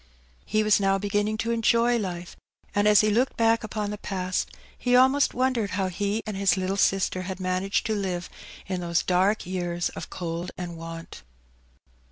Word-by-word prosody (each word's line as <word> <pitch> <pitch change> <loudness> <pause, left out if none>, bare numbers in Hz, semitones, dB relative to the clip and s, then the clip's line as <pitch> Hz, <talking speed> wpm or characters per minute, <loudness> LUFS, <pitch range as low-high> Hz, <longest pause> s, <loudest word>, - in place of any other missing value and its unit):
He 215 0 +2
was 215 -1 +4
now 195 -1 +2
beginning 205 +2 -1
to 230 +1 -1
enjoy 235 +1 +3
life^ 180 -3 -5 0.4
and 205 +1 +2
as 210 -1 +7
he 215 0 +2
looked 250 +5 +1
back 225 0 +3
upon 210 -1 -3
the 210 - -6
past 185 -2 -2 0.3
he 250 0 +1
almost 265 +2 +4
wondered 250 -4 +1
how 190 -2 0
he 205 +4 -2
and 215 -3 -4
his 195 -1 +2
little 190 +1 -1
sister 195 -1 +1
had 185 0 -5
managed 185 +1 -1
to 220 - 0
live 185 -4 -2 0.4
in 185 -1 -3
tho^e 170 -1 0
dark 190 +4 +2
years 175 -1 -2
of - - -8
cold 170 0 -4
and 175 -2 -5
want. 165 0 -8
195 Hz, 180 wpm, -26 LUFS, 185-215 Hz, 0.4 s, as